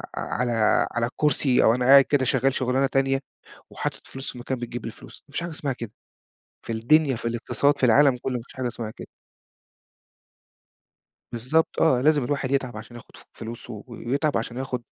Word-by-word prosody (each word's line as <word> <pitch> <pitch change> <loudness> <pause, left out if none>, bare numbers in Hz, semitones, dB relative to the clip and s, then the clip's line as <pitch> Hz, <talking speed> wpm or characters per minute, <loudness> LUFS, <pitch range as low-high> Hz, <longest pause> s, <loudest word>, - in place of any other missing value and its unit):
على 120 +1 -2 0.4
على 120 0 0
الكرسي 140 0 +2
أو 115 - +5
أنا 125 - -1
قاعد 135 +1 +8
كده 135 -1 +1
شغّال 130 +2 +2
شُغلانة 130 +1 +1
تانية 135 0 +1 0.5
وحاطط - - -5
فلوس 135 0 -4
في - - -12
مكان 130 +1 -3
بتجيب 120 -1 -6
لي 115 - -4
فلوس، - - -14
ما - - -21
فيش 145 - -2
حاجة 170 - -4
اسمها 145 -3 -3
كده 115 -3 -8 0.8
في 115 - -3
الدنيا، 135 +4 +3
في - - -10
الإقتصاد، 140 +5 0
في 130 - +3
العالم 135 +2 +5
كلّه 130 - -2
ما 120 - -5
فيش - - -16
حاجة 130 -1 -2
اسمها 115 -2 -5
كده. - - -10 2.3
بالضبط 130 +8 0
آه، 130 -6 +4
لازم 145 -1 +3
الواحد 135 0 -2
يتعَب 130 -5 -1
عشان 115 +2 -10
ياخد 120 - -13
ف - - -14
فلوسه 115 -1 -8
ويتعَب 135 +5 -1
عشان 120 +2 -4
ياخد 130 -2 -3
130 Hz, 185 wpm, -24 LUFS, 120-140 Hz, 2.3 s, قاعد